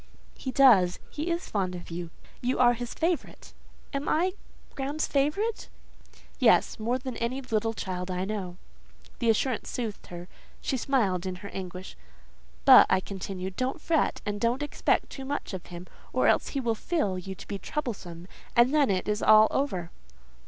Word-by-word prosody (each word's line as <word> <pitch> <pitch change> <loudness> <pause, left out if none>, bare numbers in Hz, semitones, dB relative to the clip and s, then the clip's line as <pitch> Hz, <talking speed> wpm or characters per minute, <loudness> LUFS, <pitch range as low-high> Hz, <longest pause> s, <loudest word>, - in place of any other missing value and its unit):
"He 265 - -5
does. 225 -10 +5
He 310 +4 -3
is 340 +1 -2
fond 185 -3 -1
of 175 -1 -9
you. 170 0 -5 0.3
You 250 +1 0
are 245 -1 +5
his 245 0 -6
favourite." 335 0 -2 0.4
"Am 280 +1 -2
I 355 +4 +2 0.4
Graham's 285 +2 -2
favourite?" 305 +11 0 0.7
"Yes, - - +4
more 235 +3 0
than 260 -1 -6
any 240 +3 -2
little 225 -3 -1
child 180 -2 -4
I 185 0 -2
know." 190 -4 -4 0.6
The 235 - +1
assurance 225 +1 +1
soothed 225 -4 -4
her; 175 0 -8 0.3
she - - -2
smiled 210 -9 +1
in 185 - -3
her - - -5
anguish. 185 0 -7 0.7
"But," 265 -2 +9
I 185 - +4
continued, 190 -1 -6
"don't 255 - -2
fret, 320 0 0
and 205 0 -3
don't 240 +5 +1
expect 295 - 0
too 270 - -7
much 280 -5 -4
of 185 - -6
him, 175 0 -8 0.3
or - - +2
else - - +3
he 280 - -3
will 235 -3 0
feel 215 - -1
you 190 +1 -7
to - - -12
be 200 - -4
troublesome, 185 - -5 0.3
and 240 +4 +5
then 295 -3 +4
it 185 -1 0
is 210 0 0
all 215 0 +7
over." 185 -12 -1
225 Hz, 175 wpm, -28 LUFS, 185-270 Hz, 0.7 s, But